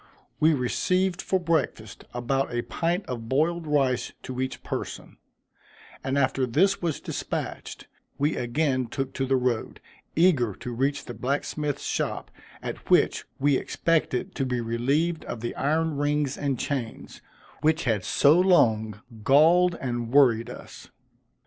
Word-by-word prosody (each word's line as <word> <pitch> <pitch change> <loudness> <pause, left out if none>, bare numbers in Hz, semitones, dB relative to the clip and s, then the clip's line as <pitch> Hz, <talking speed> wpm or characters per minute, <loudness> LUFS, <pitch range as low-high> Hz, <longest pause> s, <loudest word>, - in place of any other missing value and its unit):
We 155 +1 +4
received 185 +8 0
for 190 - 0
breakfast, 160 - -2
about 130 +3 -1
a 120 0 -1
pint 175 +3 -1
of 115 -3 -6
boiled 160 +4 +1
rice 135 -4 +1
to 130 0 -4
each 130 0 -4
person, - - -6 0.9
and 135 +1 -1
after 130 -1 +1
this 195 +11 +2
was 165 -5 -1
despatched, - - -5 0.3
we 145 +3 +1
again 130 +1 0
took 135 +3 -4
to 135 0 -2
the 135 - +3
road, 125 -3 -1 0.4
eager 145 - +3
to 125 - -6
reach 135 +4 -1
the 120 - -7
blacksmith's 145 +3 -2
shop, - - -2 0.3
at - - -6
which - - +3
we 140 0 +3
expected 155 -5 0
to - - -2
be 125 -2 -1
relieved 135 +9 0
of 110 - -6
the 120 - -3
iron 155 +2 0
rings 145 -1 0
and 140 -3 -1
chains, 120 -3 -4 0.4
which 160 +2 +2
had 110 -6 0
so 150 - +4
long 110 - +3 0.2
galled 170 +8 +5
and 120 -3 -3
worried 125 -4 +4
us. - - -11
135 Hz, 145 wpm, -26 LUFS, 125-160 Hz, 0.9 s, galled